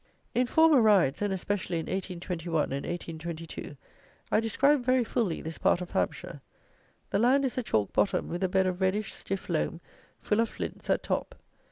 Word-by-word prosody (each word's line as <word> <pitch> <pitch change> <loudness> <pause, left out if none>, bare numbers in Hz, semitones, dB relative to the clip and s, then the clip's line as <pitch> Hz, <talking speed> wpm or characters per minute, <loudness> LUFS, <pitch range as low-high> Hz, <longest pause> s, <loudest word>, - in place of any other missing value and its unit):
In 250 0 +2
former 320 -2 +5
RIDES, 195 -10 +4
and 205 -1 0
especially 190 -2 -2
in 160 - -3
1821 175 -4 -2
and 140 +1 -3
1822, 165 -3 -6 0.5
I - - +4
described 260 +5 +2
very 255 0 +3
fully 220 -7 -1
this 160 0 -6
part - - +3
of 180 -1 -7
Hampshire. - - -2 0.7
The 200 - +2
land 265 +5 +4
is 255 - -2
a - - +1
chalk 110 - 0
bottom, 190 -2 +1
with 175 +3 -3
a 190 - +2
bed 190 +1 +2
of 185 0 -2
reddish, 195 +2 0
stiff 195 0 -5
loam, 165 0 -1 0.4
full 210 - 0
of 230 - +2
flints, - - -6
at - - +2
top. - - -2
190 Hz, 180 wpm, -29 LUFS, 170-225 Hz, 0.7 s, former